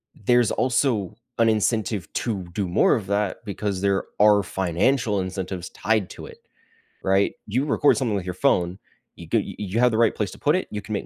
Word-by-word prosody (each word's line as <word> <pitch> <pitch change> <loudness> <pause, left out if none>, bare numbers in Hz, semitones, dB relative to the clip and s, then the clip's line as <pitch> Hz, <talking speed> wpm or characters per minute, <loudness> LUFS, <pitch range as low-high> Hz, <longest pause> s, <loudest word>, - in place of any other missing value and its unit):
there's 120 +1 +2
also 120 -6 0 0.2
an 115 -1 +4
incentive 110 -4 0
to 105 -6 -2
do 100 -2 -1
more 85 - +3
of 100 -4 -4
that 100 +1 -1
because 100 -1 -3
there 100 -1 +1
are 105 -1 +5
financial 100 +6 0
incentives 95 -1 -4
tied 110 -3 0
to - - -9
it, - - -13 0.6
right? 95 +1 +2
You 125 +7 0
record 145 0 +3
something 120 -7 0
with 95 - -3
your 90 - -3
phone, 90 -5 +1 0.4
you - - -11
go - - +1
y - - -6
you 105 +2 -2
have 125 0 +4
the 110 - 0
right 115 -1 +3
place 105 -3 -2
to - - -12
put 150 +4 +2
it, 185 - -4
you 105 - -4
can 105 - -11
make 100 - -3
105 Hz, 205 wpm, -24 LUFS, 95-115 Hz, 0.6 s, are